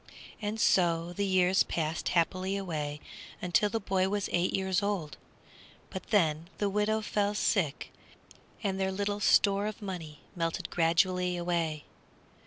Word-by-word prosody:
And 210 +1 -3
so 170 -3 +2
the 200 +2 -1
years 185 0 +4
passed 160 0 -1
happily 185 +3 +1
away 150 -6 -3 0.5
till 210 +5 +4
the 225 - -1
boy 190 -2 0
was 205 -1 -1
eight 175 +1 +2
years 190 0 0
old, 195 -7 -2 0.8
but 190 - -6
then 165 -5 +1
the 205 -1 0
widow 210 +2 +1
fell 210 -1 0
sick, 175 -8 0 0.7
and 195 -2 -1
their 190 0 0
little 205 +1 -2
store 200 0 +4
of 215 0 -5
money 170 -8 -7
melted 165 -1 -2
gradually 180 +2 +2
away. 170 -3 -1
185 Hz, 140 wpm, -30 LUFS, 170-200 Hz, 0.8 s, years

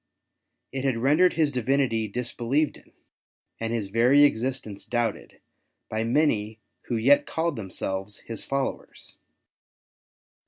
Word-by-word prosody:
It 135 -1 -4
had 135 -4 +1
rendered 150 +9 +4
His 155 -3 +2
Divinity 125 -3 +1
disbelieved 125 +6 -1
in, - - -21 0.7
and 115 0 -2
His 110 -4 -2
very 125 +7 +5
existence 125 -6 0
doubted, 120 -2 -3 0.5
by 110 - -1
ID 115 +6 +2
any 110 -6 -1 0.3
who 120 - -1
yet 130 +6 +4
called 165 +1 -1
themselves 95 -1 -4
His 115 - -6
followers. 135 0 -4
120 Hz, 120 wpm, -26 LUFS, 110-140 Hz, 0.7 s, very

